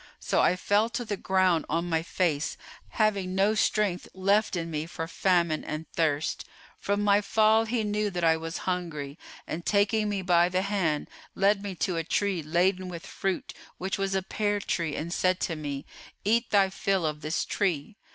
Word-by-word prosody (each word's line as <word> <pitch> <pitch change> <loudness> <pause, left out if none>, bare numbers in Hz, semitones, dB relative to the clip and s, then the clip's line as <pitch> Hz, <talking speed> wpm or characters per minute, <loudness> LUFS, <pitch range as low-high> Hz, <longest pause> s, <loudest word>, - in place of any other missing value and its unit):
So - - +1
I 180 - +4
fell 205 +4 +2
to 235 +1 -3
the 210 - -2
ground 185 -3 +2
on 170 +2 0
my 165 -2 +1
face, 165 -3 -1 0.3
having 200 -4 0
no 200 +3 +3
strength 210 -3 +1
left 200 +2 +2
in 170 -1 -3
me 155 +1 -3
for 165 -1 -5
famine 170 -3 +1
and 155 +1 -5
thirst. 155 -2 0 0.4
From 205 +1 0
my 205 0 +4
fall 220 +2 +3
he 225 0 -1
knew 210 0 0
that 175 -2 -4
I 165 -1 +5
was 165 +1 -5
hungry 165 -5 -3 0.3
and 170 +2 -5
taking 210 +2 +2
me 200 -2 -2
by 175 -1 +4
the 185 +1 0
hand, 185 -7 0 0.3
led 200 +1 +3
me 200 -2 -5
to 180 0 -1
a 165 - 0
tree 195 +1 0
laden 180 +4 +1
with 175 +1 -7
fruit 195 -1 -3 0.2
which 190 +2 -3
was 195 0 0
a 190 - 0
pear 205 +1 -1
tree[FN#436] 170 -6 -2
and 170 +2 -3
said 185 -1 +1
to 165 - -1
me, 145 -2 -5 0.4
'Eat 230 +3 +2
thy 195 -2 +4
fill 195 -2 0
of 150 -1 -2
this 155 +2 -1
tree. 185 -1 -1
185 Hz, 190 wpm, -28 LUFS, 165-205 Hz, 0.4 s, I